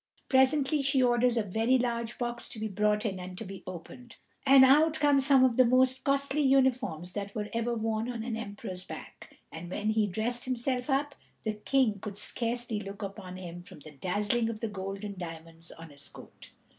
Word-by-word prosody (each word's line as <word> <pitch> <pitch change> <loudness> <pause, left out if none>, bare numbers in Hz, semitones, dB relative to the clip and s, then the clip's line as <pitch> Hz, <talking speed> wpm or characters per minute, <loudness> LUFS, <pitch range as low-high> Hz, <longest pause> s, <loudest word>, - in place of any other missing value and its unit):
Presently 270 +2 +3
she 275 -1 +2
orders 240 0 +3
a 225 - +2
very 225 +6 +2
large 235 -1 -2
box 240 -1 -3
to 220 - -7
be 220 - -2
brought 210 +1 +1
in 195 -3 -2
and 180 0 -8
to 225 - -6
be 195 0 -8
opened, 185 +7 -9 0.3
and 270 -1 +9
out 300 +4 +5
come 290 -2 +4
some 270 -1 +5
of 250 -3 +3
the 255 - +8
most 255 +1 +3
costly 280 +1 +1
uniforms 255 - +2
that 200 +1 -5
were 210 -1 -3
ever 230 +1 -1
worn 225 +1 -1
on 230 -2 -5
an 235 -1 -3
emperor's 200 -4 -6
back; - - -11
and 170 +2 -8
when 215 +4 -1
he 215 -1 +2
dressed 225 +5 -2
himself 255 +1 -2
up, 285 +1 +1 0.3
the 220 - -1
King 215 0 +1
could 200 0 -7
scarcely 235 0 -2
look 200 0 -7
upon 190 -2 -7
him 175 -1 -8
from 175 - -14
the 155 - -12
dazzling 205 - 0
of 220 -2 -5
the 230 - -2
gold 195 0 -6
and 200 -2 -6
diamonds 165 -1 -9
on 165 -1 -12
his 140 0 -10
coat. - - -14
225 Hz, 200 wpm, -29 LUFS, 195-255 Hz, 0.3 s, and